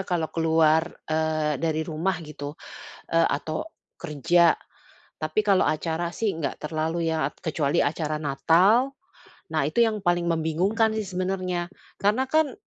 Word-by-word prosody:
kalau 165 Hz, -4 st, -2 dB
keluar, 160 Hz, 0 st, +3 dB, 0.2 s
eee, 155 Hz, -2 st, 0 dB
dari 160 Hz, -1 st, 0 dB
rumah 165 Hz, +4 st, -1 dB
gitu, 150 Hz, -1 st, -7 dB, 0.5 s
e 165 Hz, -, +1 dB
atau 155 Hz, -, 0 dB, 0.3 s
kerja. 170 Hz, +4 st, +3 dB, 0.6 s
Tapi 155 Hz, +7 st, 0 dB
kalau 200 Hz, -3 st, +3 dB
acara 165 Hz, +2 st, -1 dB
sih 225 Hz, -, 0 dB
enggak 140 Hz, -4 st, -4 dB
terlalu 160 Hz, +2 st, -1 dB
ya, 155 Hz, -3 st, -1 dB
kecuali 150 Hz, -3 st, 0 dB
acara 155 Hz, 0 st, -1 dB
Natal, 185 Hz, -, +3 dB, 0.6 s
nah 155 Hz, -2 st, 0 dB
itu 155 Hz, +11 st, 0 dB
yang 220 Hz, -3 st, +2 dB
paling 175 Hz, -1 st, +1 dB
membingungkan 180 Hz, +8 st, +1 dB
sih 220 Hz, -1 st, -2 dB
sebenarnya. 185 Hz, -1 st, -2 dB, 0.2 s
Karena 215 Hz, +6 st, +1 dB
kan, 310 Hz, -2 st, +2 dB
165 Hz, 135 wpm, -25 LUFS, 155-185 Hz, 0.6 s, keluar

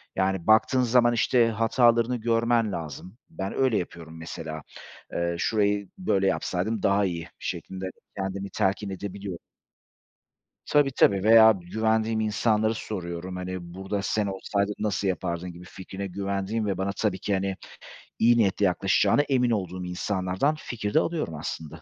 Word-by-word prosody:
Yani, 95 Hz, -2 st, 0 dB
baktığın 110 Hz, +4 st, +5 dB
zaman, 120 Hz, 0 st, +4 dB
işte, 120 Hz, +1 st, +3 dB
hatalarını 115 Hz, +2 st, +3 dB
görmen 115 Hz, -1 st, +1 dB
lazım. 85 Hz, -, -7 dB
Ben 95 Hz, +1 st, -5 dB
öyle 130 Hz, -5 st, +2 dB
yapıyorum 80 Hz, -2 st, -6 dB
mesela. 80 Hz, -1 st, -6 dB, 0.5 s
Eee, 85 Hz, 0 st, -1 dB
"Şurayı 105 Hz, -2 st, +1 dB
böyle 95 Hz, -, +1 dB
yapsaydım 95 Hz, +3 st, -1 dB
daha 100 Hz, +1 st, +3 dB
iyi..." 85 Hz, -2 st, -4 dB
şeklinde 95 Hz, 0 st, -5 dB, 0.3 s
kendimi 95 Hz, 0 st, -3 dB
telkin 100 Hz, +2 st, 0 dB
edebiliyorum. 95 Hz, -1 st, -6 dB, 1.3 s
Tabii 145 Hz, -2 st, +3 dB
tabii 100 Hz, -6 st, +3 dB
veya 110 Hz, 0 st, +8 dB
güvendiğim 110 Hz, +4 st, 0 dB
insanlara 110 Hz, 0 st, +1 dB
soruyorum. 90 Hz, -4 st, -5 dB
Hani, 90 Hz, -1 st, -6 dB
"Burada 95 Hz, +1 st, -3 dB
sen 105 Hz, 0 st, 0 dB
olsaydın 100 Hz, +1 st, -1 dB
nasıl 100 Hz, -2 st, -1 dB
yapardın?" 90 Hz, -1 st, -2 dB
gibi 85 Hz, +1 st, -12 dB
fikrine 95 Hz, +2 st, -7 dB
güvendiğim 100 Hz, +3 st, -2 dB
ve 95 Hz, -3 st, -1 dB
bana 95 Hz, +1 st, -1 dB
tabii 100 Hz, -4 st, 0 dB
ki, 100 Hz, -, -1 dB
hani, 95 Hz, 0 st, -1 dB, 0.6 s
iyi 120 Hz, +1 st, +5 dB
niyetle 100 Hz, -2 st, +2 dB
yaklaşacağına 95 Hz, +9 st, +3 dB
emin 125 Hz, -4 st, +1 dB
olduğum 90 Hz, -3 st, -2 dB
insanlardan 95 Hz, +8 st, -1 dB
fikir 105 Hz, -4 st, -4 dB
de 155 Hz, -, +6 dB
alıyorum 160 Hz, -, -2 dB
aslında. 80 Hz, +1 st, -6 dB
100 Hz, 140 wpm, -26 LUFS, 90-110 Hz, 1.3 s, veya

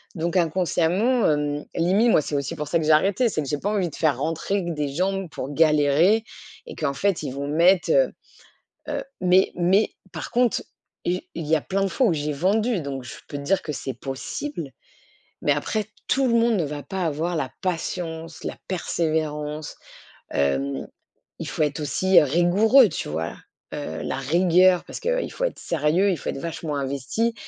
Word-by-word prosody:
Donc 170 Hz, +2 st, -1 dB
inconsciemment, 180 Hz, +7 st, +2 dB
hem, 145 Hz, 0 st, -1 dB
limite, 195 Hz, +8 st, +3 dB
moi, 155 Hz, -, +5 dB
c'est 145 Hz, -, -4 dB
aussi 140 Hz, -2 st, -2 dB
pour 150 Hz, -2 st, -4 dB
ça 170 Hz, -, +2 dB
que 155 Hz, -, -2 dB
j'ai 160 Hz, -, +4 dB
arrêté. 195 Hz, +10 st, +4 dB
C'est 155 Hz, -, -1 dB
que 140 Hz, -, -5 dB
j'ai 145 Hz, -, 0 dB
pas 200 Hz, -, -2 dB
envie 190 Hz, -4 st, 0 dB
de 145 Hz, -, -11 dB
faire 150 Hz, -5 st, +1 dB
rentrer 165 Hz, +6 st, -1 dB
que 175 Hz, -, -3 dB
des 150 Hz, -2 st, -2 dB
gens 190 Hz, +5 st, -1 dB
pour 135 Hz, -2 st, -6 dB
galérer 155 Hz, +7 st, +4 dB, 0.4 s
et -, -, -8 dB
qu'en 155 Hz, -3 st, -1 dB
fait, 180 Hz, +3 st, 0 dB
ils 140 Hz, -, -3 dB
vont 140 Hz, +1 st, -4 dB
mettre, 175 Hz, +5 st, +4 dB
heu, -, -, +3 dB, 0.8 s
heu -, -, -2 dB, 0.2 s
Mais 185 Hz, +1 st, +4 dB
mais 185 Hz, +5 st, +2 dB, 0.2 s
par -, -, -6 dB
contre, 245 Hz, -1 st, +2 dB, 0.4 s
i 180 Hz, +1 st, -1 dB
il 165 Hz, -2 st, -4 dB
y 160 Hz, -, +4 dB
a 155 Hz, -, 0 dB
plein 195 Hz, +1 st, -1 dB
de -, -, +2 dB
fois 260 Hz, -, +1 dB
où 180 Hz, -, +2 dB
j'ai 150 Hz, -1 st, -2 dB
vendu, 210 Hz, -, +1 dB
donc 135 Hz, -3 st, -5 dB
je 115 Hz, -, -8 dB
peux 145 Hz, -, -5 dB
te -, -, -6 dB
dire 190 Hz, +6 st, +1 dB
que 150 Hz, -, -4 dB
c'est 135 Hz, -, -4 dB
possible. 135 Hz, -, -5 dB, 0.7 s
Mais 145 Hz, -, +3 dB
après, 205 Hz, +9 st, -2 dB, 0.2 s
tout 270 Hz, -1 st, +3 dB
le 235 Hz, -, +1 dB
monde 230 Hz, -2 st, +3 dB
ne 170 Hz, -, 0 dB
va 145 Hz, 0 st, -5 dB
pas 190 Hz, -2 st, -3 dB
avoir 165 Hz, +3 st, -1 dB
la 135 Hz, -4 st, -2 dB
patience, 165 Hz, -2 st, -4 dB
la -, -, -4 dB
persévérance. 155 Hz, -4 st, -2 dB, 0.6 s
Hem, 70 Hz, 0 st, 0 dB, 0.5 s
il -, -, -5 dB
faut -, -, -3 dB
être 150 Hz, +1 st, -1 dB
aussi, 185 Hz, +5 st, +4 dB
heu, -, -, +4 dB
rigoureux, 195 Hz, -, +5 dB
tu 155 Hz, -, -4 dB
vois? 80 Hz, +2 st, -3 dB, 0.4 s
Heu, 80 Hz, +1 st, -5 dB
la -, -, -2 dB
rigueur 175 Hz, +5 st, +4 dB
parce -, -, -7 dB
qu'il -, -, -1 dB
faut -, -, -5 dB
être -, -, -3 dB
sérieux, 170 Hz, +5 st, +1 dB
il 175 Hz, -, -1 dB
faut -, -, -5 dB
être -, -, -3 dB
vachement 160 Hz, -1 st, -4 dB
investi 140 Hz, -, -1 dB
165 Hz, 195 wpm, -24 LUFS, 145-190 Hz, 0.8 s, moi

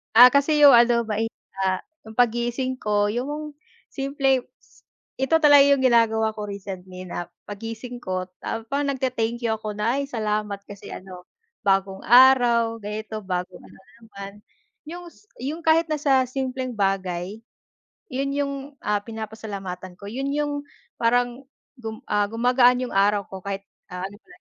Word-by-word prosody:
Ah, 245 Hz, +2 st, +11 dB
kasi 285 Hz, +2 st, +3 dB
'yung 285 Hz, -1 st, +10 dB
ano 235 Hz, 0 st, +4 dB
mai 220 Hz, +1 st, 0 dB, 0.3 s
ta 190 Hz, -1 st, 0 dB, 0.2 s
'yung 220 Hz, 0 st, -11 dB
paggising 240 Hz, +2 st, +1 dB
ko 205 Hz, -1 st, +2 dB
'yung 295 Hz, +6 st, -4 dB, 0.4 s
simpleng 270 Hz, -2 st, +1 dB, 0.2 s
s -, -, -26 dB, 0.4 s
ito 265 Hz, +5 st, +3 dB
talaga 290 Hz, -2 st, +8 dB
'yung 280 Hz, -1 st, +4 dB
ginagawa 225 Hz, -3 st, +3 dB
ko 210 Hz, -, -5 dB
recently 185 Hz, -2 st, -7 dB
na, 175 Hz, 0 st, -5 dB, 0.2 s
paggising 225 Hz, +4 st, -7 dB
ko, 185 Hz, -2 st, -3 dB, 0.2 s
tap 225 Hz, 0 st, -4 dB
nagte-thank 260 Hz, -4 st, -1 dB
you 225 Hz, -, +2 dB
ako 215 Hz, -1 st, -5 dB
na, 230 Hz, +6 st, +1 dB
"ay -, -, -3 dB
salamat 210 Hz, -4 st, -2 dB
kasi 200 Hz, -1 st, -10 dB
ano, 185 Hz, -1 st, -10 dB, 0.4 s
bagong 195 Hz, 0 st, +1 dB
araw, 240 Hz, -2 st, +5 dB
ganito 215 Hz, +1 st, -5 dB
bagong 180 Hz, -1 st, -4 dB
ano -, -, -16 dB, 0.2 s
naman," 200 Hz, -3 st, -9 dB, 0.6 s
'yung 350 Hz, +1 st, -8 dB
s -, -, -24 dB, 0.2 s
'yung 300 Hz, +6 st, -4 dB
kahit 325 Hz, +1 st, +4 dB
nasa 280 Hz, -4 st, +2 dB
simpleng 260 Hz, -1 st, -3 dB
bagay 195 Hz, -1 st, -1 dB, 0.7 s
'yun 275 Hz, +2 st, -1 dB
'yung, 280 Hz, -1 st, -1 dB, 0.3 s
ah, 210 Hz, -1 st, +1 dB
pinapasalamatan 205 Hz, -5 st, -7 dB
ko, 200 Hz, -, -10 dB
'yun 270 Hz, +5 st, -3 dB
'yung, 295 Hz, 0 st, 0 dB, 0.5 s
parang 245 Hz, +2 st, +1 dB, 0.4 s
gum 220 Hz, -2 st, -7 dB
ah, 205 Hz, -1 st, +2 dB
gumagaan 245 Hz, +2 st, +4 dB
'yung 250 Hz, -, -6 dB
araw 200 Hz, +1 st, +3 dB
ko 190 Hz, -, -8 dB
kahit, 195 Hz, 0 st, -4 dB, 0.3 s
ah, 180 Hz, +1 st, -4 dB
ano 200 Hz, +1 st, -11 dB
ko -, -, -48 dB
225 Hz, 150 wpm, -24 LUFS, 200-260 Hz, 0.7 s, Ah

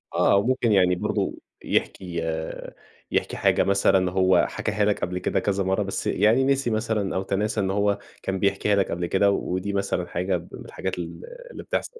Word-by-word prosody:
آه، -, -, +4 dB
وممكن 120 Hz, +2 st, +2 dB
يعني 90 Hz, -2 st, +4 dB
برضه -, -, -1 dB, 0.3 s
يحكي 85 Hz, -3 st, -2 dB
آآ، 80 Hz, 0 st, -4 dB, 0.4 s
يحكي -, -, -1 dB
حاجة -, -, +3 dB
مثلًا 95 Hz, -2 st, +3 dB
هو 95 Hz, -1 st, +4 dB
حكاها 105 Hz, 0 st, -1 dB
لك 105 Hz, -, +1 dB
قبل 90 Hz, 0 st, -2 dB
كده -, -, 0 dB
كذا 100 Hz, -1 st, 0 dB
مرة، 95 Hz, +1 st, +1 dB
بس -, -, -4 dB
يعني 110 Hz, +6 st, +3 dB
نسي 135 Hz, -2 st, +1 dB
مثلًا 110 Hz, -3 st, -1 dB
أو 95 Hz, -, 0 dB
تناسى 105 Hz, +3 st, -1 dB
إن 95 Hz, -1 st, 0 dB
هو 100 Hz, 0 st, +1 dB, 0.2 s
كان 95 Hz, 0 st, -2 dB
بيحكيها 100 Hz, +1 st, +1 dB
لك 100 Hz, -1 st, +1 dB
قبل 85 Hz, +1 st, -2 dB
كده 100 Hz, +3 st, +3 dB
و 100 Hz, -, +1 dB, 0.2 s
ودي 95 Hz, +2 st, -2 dB
مثلًا 100 Hz, -3 st, -1 dB
حاجة 90 Hz, +2 st, -1 dB
من -, -, -9 dB
الحاجات 95 Hz, -1 st, -5 dB
ال 85 Hz, -, -6 dB, 0.3 s
اللي -, -, -8 dB
بتحصل. 470 Hz, -1 st, -4 dB
100 Hz, 190 wpm, -24 LUFS, 90-105 Hz, 0.4 s, آه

